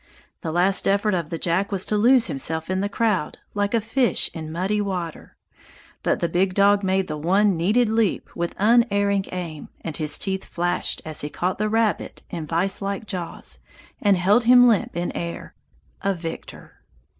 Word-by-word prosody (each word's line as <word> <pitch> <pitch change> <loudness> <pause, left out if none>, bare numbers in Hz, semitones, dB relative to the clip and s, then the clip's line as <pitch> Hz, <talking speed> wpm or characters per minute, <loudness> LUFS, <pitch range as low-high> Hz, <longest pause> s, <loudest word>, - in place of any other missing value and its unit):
The 160 - -3
last 180 +4 +2
effort 200 +1 +2
of 170 -4 -2
the 165 - -3
Jack 185 +5 0
was 190 -2 +1
to 215 - -1
lose 240 +3 +5
himself 160 +5 -1
in 185 - 0
the 200 +1 -1
crowd, 205 -7 0 0.2
like 205 +2 0
a - - +3
fish 235 +3 +1
in 160 -2 -6
muddy 190 +5 -1
water; 180 -5 -5 0.6
but - - 0
the 170 - +2
big 185 +2 0
dog 200 0 +4
made 190 0 +1
the 155 -1 -4
one 195 +5 +3
needed 210 +9 +2
leap 220 -2 0
with 170 0 -3
unerring 200 -3 +3
aim 170 -5 -6
and 160 -3 -5
his 150 -2 +2
teeth 190 -1 -2
flashed 175 +1 -1
as 155 -1 -1
he 145 - -4
caught 180 +5 -2
the 215 0 0
rabbit 225 -1 -1
in 160 -2 -5
viselike 195 +5 -1
jaws 180 -4 -4 0.4
and 200 -2 +4
held 205 +7 +3
him 245 +1 +7
limp 215 -6 +1
in 175 0 -2
air, 170 0 -6 0.5
a 195 -1 0
victor! 165 -1 -8
190 Hz, 180 wpm, -23 LUFS, 170-210 Hz, 0.6 s, him